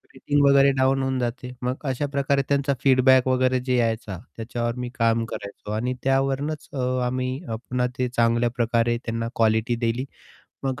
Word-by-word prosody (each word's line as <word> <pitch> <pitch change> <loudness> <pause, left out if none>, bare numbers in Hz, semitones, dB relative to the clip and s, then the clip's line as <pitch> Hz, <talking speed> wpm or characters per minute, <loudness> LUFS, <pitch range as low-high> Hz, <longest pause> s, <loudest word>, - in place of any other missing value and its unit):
Rating 145 +2 +1
वगैरे 140 0 +6
down 135 +1 +3
होऊन 130 0 -1
जाते. 125 +1 -3
मग 125 +1 0 0.2
अशा 130 +3 -2
प्रकारे 140 0 +1
त्यांचा 140 0 +2
फीडबॅक 130 -1 +5
वगैरे 130 0 +2
जे 125 0 -1
यायचा, 115 -4 -1 0.2
त्याच्यावर 120 +1 -3
मी 125 0 -3
काम 115 0 +2
करायचो. 100 -1 -8
आणि 120 +4 -1
त्यावरूनच 135 +3 0
अ, - - -5 0.3
आम्ही 130 +1 -2
अ, 115 - -3
पुन्हा 125 +2 -2
ते 125 -1 0
चांगल्या 120 0 +2
प्रकारे 120 0 +1
त्यांना 115 0 -2
क्वालिटी 110 +1 +2
दिली. 120 +3 -1 0.6
मग 130 -1 -2
125 Hz, 165 wpm, -24 LUFS, 115-135 Hz, 0.6 s, वगैरे